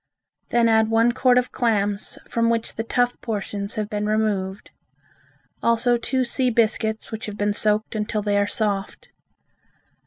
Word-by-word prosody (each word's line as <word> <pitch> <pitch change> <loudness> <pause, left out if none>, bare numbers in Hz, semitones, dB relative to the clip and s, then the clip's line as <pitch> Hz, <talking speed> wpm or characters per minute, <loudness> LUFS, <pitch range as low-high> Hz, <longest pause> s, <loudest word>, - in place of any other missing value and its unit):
Then 235 -1 +3
add 220 -1 +3
one 225 +1 +4
quart 250 0 +3
of 250 0 +1
clams 205 -4 -1
from 230 0 +1
which 230 -1 -1
the 225 - -2
tough 245 +1 0
portions 205 -2 -4
have 215 -1 -2
been 210 0 -2
removed. 210 -3 -1 0.9
Also 235 +1 +3
two 255 +2 0
sea 255 +1 0
biscuits 220 -1 0
which 220 0 -5
have 210 -1 -6
been 205 0 0
soaked 210 +1 0
until 215 -1 -2
they 205 0 +1
are 205 - +1
soft. 205 -2 -2
220 Hz, 155 wpm, -23 LUFS, 205-235 Hz, 0.9 s, one